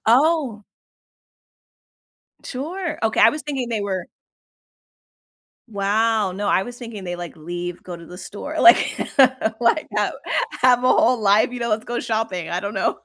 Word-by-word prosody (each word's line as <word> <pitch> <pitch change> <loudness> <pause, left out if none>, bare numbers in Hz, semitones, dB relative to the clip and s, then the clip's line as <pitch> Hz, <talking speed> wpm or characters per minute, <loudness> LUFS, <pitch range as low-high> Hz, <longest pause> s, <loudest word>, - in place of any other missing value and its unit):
Oh! 260 -5 +2 1.8
Sure, 320 +6 -5
okay, 220 0 +1
I - - +8
was 300 -1 -6
thinking 270 -4 -3
they 220 -3 -2
were 190 -3 -3 1.6
Wow, 210 0 0
no, 205 +2 -4
I 190 - +3
was 245 +2 -8
thinking 230 -6 -8
they, 175 0 -4
like, 175 -1 -7
leave, 175 +2 -6
go 175 -2 -8
to 170 - -12
the 180 +2 -11
store. 290 +12 -7
Like 345 - +5 0.6
like, 240 +6 +2
have - - +1 0.5
have 250 -1 +4
a - - +4
whole 250 - +3
life, 205 +2 +3
you 245 - -6
know? 235 -1 -1
Let's 220 +2 0
go 240 0 -2
shopping. 220 -7 -3
I 175 - -1
don't 200 +1 -5
know. 190 - 0
220 Hz, 160 wpm, -21 LUFS, 190-250 Hz, 1.8 s, I